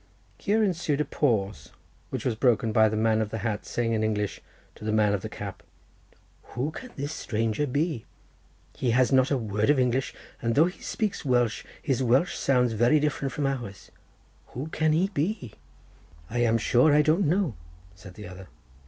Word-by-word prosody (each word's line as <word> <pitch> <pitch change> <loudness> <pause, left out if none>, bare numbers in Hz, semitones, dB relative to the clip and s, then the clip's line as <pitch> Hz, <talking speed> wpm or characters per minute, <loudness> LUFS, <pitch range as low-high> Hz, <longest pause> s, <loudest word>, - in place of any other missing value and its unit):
Here 215 +2 +2
ensued 170 -7 0
a 150 - +1
pause, 100 - -1 0.4
which - - -5
was 125 - +1
broken 115 -1 +2
by 110 0 +5
the 110 - -2
man 110 0 +2
of 110 - -2
the 110 - -4
hat 110 -2 -2
saying 115 -1 -1
in 110 -1 0
English 105 -2 -1 0.3
to - - -14
the 110 - -1
man 105 -1 +3
of 100 - -1
the - - -6
cap— - - -7 0.9
"Who 135 +6 -1
can 255 +10 -9
this 145 +2 -4
strange 110 -5 -2
fellow 150 - +1
be? 145 -2 -1 0.7
he 125 - -1
has 130 0 +3
not 130 0 +4
a 140 - +2
word 105 -1 -1
of 145 - +5
English, 130 +1 0 0.3
and 115 0 0
though 155 +4 +6
he 180 - -5
speaks 215 -5 -2
Welsh, 120 -5 +1 0.2
his 135 -2 0
Welsh 130 +7 +2
sounds 125 -3 +2
very 120 +7 +4
different 145 -2 -1
from 140 +3 -2
ours. 120 -8 -4 0.6
Who 135 +6 -4
can 155 0 +1
he 175 +5 +2
be?" 155 - -2 0.8
"I 120 - -1
am 115 -1 +3
sure 125 +6 +4
I 150 - +5
don't 160 +5 +2
know," 175 - +1 0.4
said 95 -1 -13
the 105 -2 -9
other. 90 +1 -11
125 Hz, 190 wpm, -27 LUFS, 110-150 Hz, 0.9 s, though